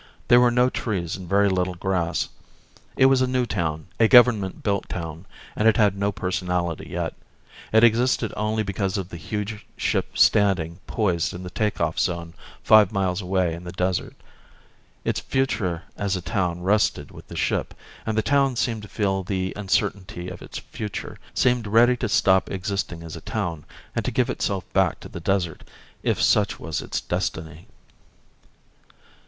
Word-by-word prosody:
There 120 - +8
were 125 0 +5
no 125 +1 +3
trees 90 -7 -2
and 90 -2 -9
very 100 +1 +4
little 90 -1 0
grass. 85 -1 -1 0.7
It 130 - +6
was 135 -1 +5
a 130 - +3
new 125 -1 +1
town, 80 -8 -2
a 115 - +6
government 110 -6 +5
built 100 -2 -1
town, 85 +1 -6 0.3
and 110 - +2
it 110 - +5
had 105 -4 +4
no 100 +1 0
personality 90 -3 -2
yet. - - -3 0.6
It 110 +1 +5
existed 120 0 +3
only 110 +1 0
because 100 0 -2
of 95 -2 -4
the 85 - -7
huge 105 +5 -4
ship - - -1
standing 95 -5 +3
poised 90 -7 0
in 90 - -7
the 90 - -7
take 105 +2 -1
off 80 -1 0
zone 85 -2 -1 0.3
five 110 -3 +6
miles 95 -2 0
away 90 -2 0
in 85 +1 -8
the 90 - -6
desert. 90 -1 -1 0.9
Its - - 0
future 110 -11 -1
as 100 -1 -1
a 90 - -3
town 90 0 -1
rested 105 +3 +1
with - - -13
the - - -9
ship, - - -1 0.3
and 110 -1 -2
the 110 - +2
town 140 -2 +2
seemed 115 -2 -1
to 105 - -10
feel 95 -2 0
the 95 0 -2
uncertainty 95 -2 -1
of 90 -1 -9
its - - -8
future, 105 -3 -6 0.2
seemed 125 -3 +2
ready 120 +4 +5
to 120 -2 -2
stop 95 -1 +3
existing 95 -3 -3
as 80 -1 -7
a 80 - -9
town 85 -8 -3 0.3
and - - 0
to - - -1
give - - +1
itself - - -2
back - - +2
to - - -10
the - - -7
desert, 85 -2 -1 0.4
if - - 0
such 105 -1 +2
was 80 -2 -3
its - - -3
destiny. 80 +1 -4
95 Hz, 175 wpm, -24 LUFS, 90-110 Hz, 0.9 s, There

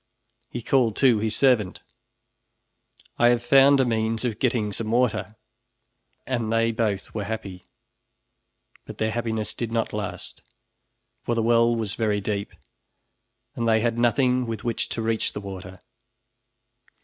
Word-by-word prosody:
He 120 - -6
called 120 -5 +2
to 125 -5 +4
his 110 0 0
servant, 120 -9 +2 1.4
"I 120 - +6
have 120 -1 +3
found 135 +2 +6
a 130 - +4
means 115 0 -1
of 115 -3 -2
getting 115 -5 0
some 110 +2 -4
water," 115 -2 0 0.9
and 120 -4 -2
they 115 0 +2
both 110 -4 -2
were 105 -2 -3
happy. 100 -4 -6 1.2
But - - -9
their 110 0 0
happiness 110 -2 -2
did 115 -2 -4
not 115 -1 -1
last, 105 -2 -5 0.8
for 120 - -2
the 115 - 0
well 115 0 +4
was 110 -3 -2
very 105 -3 0
deep 100 0 -3 1.0
and 115 - -2
they 110 0 +3
had 115 0 0
nothing 125 +1 +2
with 115 -2 -5
which 120 -2 -2
to 115 - -3
reach 110 0 -1
the - - -4
water. 95 -2 -9
115 Hz, 145 wpm, -24 LUFS, 110-120 Hz, 1.4 s, I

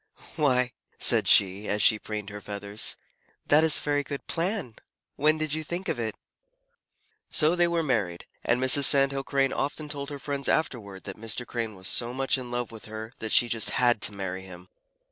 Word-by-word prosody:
"Why," 130 -5 +2 0.3
said - - +5
she, 100 +1 +3
as 105 - 0
she 110 +1 +4
preened 105 -1 -6
her 105 0 -8
feathers, 100 +1 -1 0.5
"that 150 +2 +4
is 160 -1 +5
a - - -7
very 145 -1 0
good 140 -1 -7
plan. 170 - -3 0.4
When 155 +2 +2
did 155 -1 -1
you 155 0 -2
think 175 +4 -5
of 135 - -2
it?" 110 -2 -3 1.1
So 155 +2 +4
they 175 -1 +3
were 170 -1 0
married, 100 - -1 0.2
and 115 +1 +1
Mrs. 130 +2 +6
Sand 135 0 +6
Hill 135 0 -3
Crane 135 -1 0
often 145 +2 -3
told 140 -1 -5
her 145 - -6
friends 140 0 -3
afterward 100 -11 -2
that 100 +1 -9
Mr. 115 +2 -3
Crane 115 -3 -4
was 95 0 -8
so 120 +1 0
much 135 0 +1
in 125 -1 -8
love 120 -1 -3
with 110 -1 -11
her 110 +2 -8
that 110 - -5
she 120 - +5
just 115 -1 +1
had 120 -3 +3
to 110 - 0
marry 95 -2 -5
him. 90 -1 -13
125 Hz, 200 wpm, -27 LUFS, 105-145 Hz, 1.1 s, Mrs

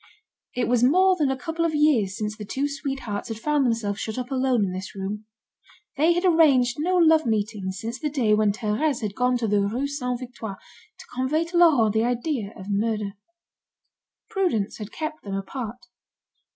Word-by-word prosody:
It 250 - 0
was 245 -1 +2
more 370 +8 +5
than 300 -6 +1
a 265 - -1
couple 325 +5 -3
of 325 -2 0
years 250 -11 +2
since 210 0 -3
the 215 - -8
two 265 +7 -2
sweethearts 270 -7 -4
had 225 - -5
found 290 +3 +1
themselves 215 -3 -1
shut 220 +1 -4
up 250 +1 -4
alone 255 -5 +2
in 185 - -3
this 185 +2 -6
room. 200 +2 -5 0.7
They 315 +5 +4
had 350 +2 -1
arranged 280 -8 +4
no 360 +4 +1
love 320 -4 +5
meetings 205 -3 -2
since 230 +5 -5
the 300 - -1
day 250 -7 +1
when 210 -1 +3
Thérèse 225 +6 -1
had 205 -2 -2
gone 250 +2 +1
to 235 -2 -1
the 205 -1 +2
Rue 225 +7 -1
Saint 250 -4 -3
Victor 240 -5 -7 0.4
to - - -12
convey 270 +6 0
to 345 +1 -3
Laurent 270 -12 +5
the 220 0 +2
idea 240 -2 -1
of 190 - -9
murder. 210 0 -1 1.2
Prudence 350 - -1
had 210 0 -7
kept 310 0 -5
them 195 -1 -4
apart. 230 +4 -6
245 Hz, 190 wpm, -24 LUFS, 210-295 Hz, 1.2 s, more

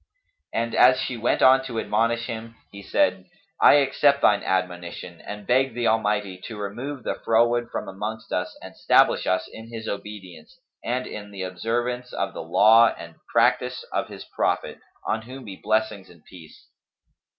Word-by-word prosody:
And 115 0 -2
as 130 +1 +6
she 125 - -3
went 115 +1 0
on 130 0 +6
to 120 -4 -4
admonish 115 +2 0
him, 115 -1 -7 0.2
he 100 - -10
said, 95 -1 0 0.3
"I - - +8
accept 140 0 +3
thine 105 - +4
admonition 90 -2 -3
and 105 0 -7
beg 130 +1 +2
the 120 -1 -1
Almighty 105 -4 0
to 115 - -7
remove 120 +7 -5
the - - -3
froward 120 +1 +2
from - - -5
amongst 105 +3 -6
us 90 0 -3
and - - -10
stablish - - +3
us 95 0 0
in 110 +1 -12
His 110 -1 -7
obedience 105 - -8 0.3
and 125 +2 -2
in 105 -1 -8
the 100 -2 -6
observance 120 +7 -3
of - - -2
the - - -6
law 115 +2 +5
and 85 0 -10 0.2
practice - - +2
of - - -1
His - - -10
Prophet, - - -2 0.3
on 110 - -1
whom 130 +3 -10
be 100 -3 -8
blessings 110 -2 -1
and 85 -2 -19
peace!" 80 -4 -15
110 Hz, 170 wpm, -24 LUFS, 100-120 Hz, 0.3 s, I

